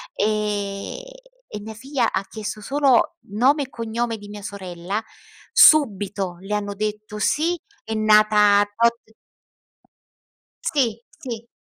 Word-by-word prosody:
ehm, 210 - -2 0.5
e 210 - -7
mia 220 +1 -8
figlia 260 0 -1
ha 190 - -1
chiesto 215 0 -6
solo 275 +5 +2
nome 270 +7 +3
e 265 - -9
cognome 230 -1 -3
di 205 0 -12
mia 205 0 -8
sorella, 190 0 -5 0.5
subito 200 - +4
le 200 +2 -5
hanno 205 -1 -3
detto: 210 0 -4
"Sì, 335 +8 +1 0.2
è 220 - -5
nata 210 -1 +5
tot" 235 0 +2 1.6
Si, 235 -6 0 0.2
sì, 235 -6 -7
215 Hz, 120 wpm, -22 LUFS, 205-240 Hz, 1.6 s, nata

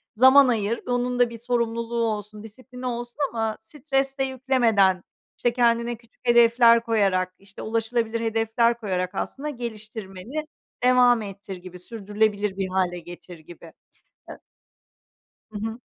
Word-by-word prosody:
zaman 260 +3 +7
ayır, 225 -1 0
onun 245 0 -1
da 245 -1 +4
bir 230 - -8
sorumluluğu 235 0 -1
olsun, 210 -1 -4
disiplini 250 +3 -11
olsun 240 +1 -4
ama 225 -2 -2
stres 270 +2 -2
de 270 - +1
yüklemeden, 235 -8 +2 0.3
işte, 240 -1 +1
kendine 235 -1 +2
küçük 240 +1 -18
hedefler 235 0 +6
koyarak, 195 -5 +1
işte, 195 0 -13
ulaşılabilir 230 0 -1
hedefler 225 +1 +1
koyarak, 185 -4 -2
aslında 295 +2 -4
geliştirmeni 220 +2 -6 0.4
devam 250 -2 +5
ettir 195 -1 -8
gibi, 180 0 -11
sürdürülebilir 205 -1 -1
bir 190 -1 -1
hâle 180 -2 0
getir 175 0 -11
gibi. 165 +1 -14 0.6
E - - -6 1.2
Hı 210 - -5
hı. 225 +2 -4
230 Hz, 130 wpm, -24 LUFS, 205-245 Hz, 1.2 s, zaman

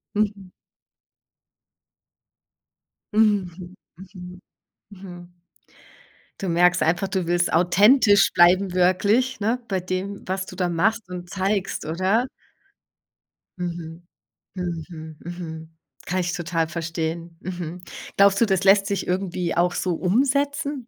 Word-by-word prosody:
Mhm. 200 -3 -2 2.6
Mhm. 190 -4 +1 0.2
Mhm. 180 -1 -11 0.5
Mhm. 175 -2 -12 1.0
Du 190 - -2
merkst 180 +1 +3
einfach, 175 +4 +1
du 190 -3 -2
willst 175 0 +1
authentisch 205 +6 +5
bleiben 180 +2 +4
wirklich, 200 +8 +2
ne? 225 +5 0
Bei 190 -1 0
dem, 185 +2 -4
was 190 0 -2
du 185 - -11
da 180 -2 +1
machst 205 +6 0
und 180 -1 -7
zeigst, 195 0 -2
oder? 185 +9 +1 1.3
Mhm. 170 -1 -6 0.5
Mhm. 165 -3 -6
Mhm. 160 -2 -8 0.3
Kann 185 +1 -1
ich 175 0 -1
total 165 -2 -1
verstehen. 165 0 -4
Mhm. 175 -1 -6 0.4
Glaubst 200 +1 +5
du, 230 - +5
das 190 -2 +1
lässt 195 0 +5
sich 200 -2 -2
irgendwie 180 -2 -2
auch 175 +1 +2
so 180 -2 -1
umsetzen? 280 - 0
180 Hz, 110 wpm, -23 LUFS, 175-200 Hz, 2.6 s, authentisch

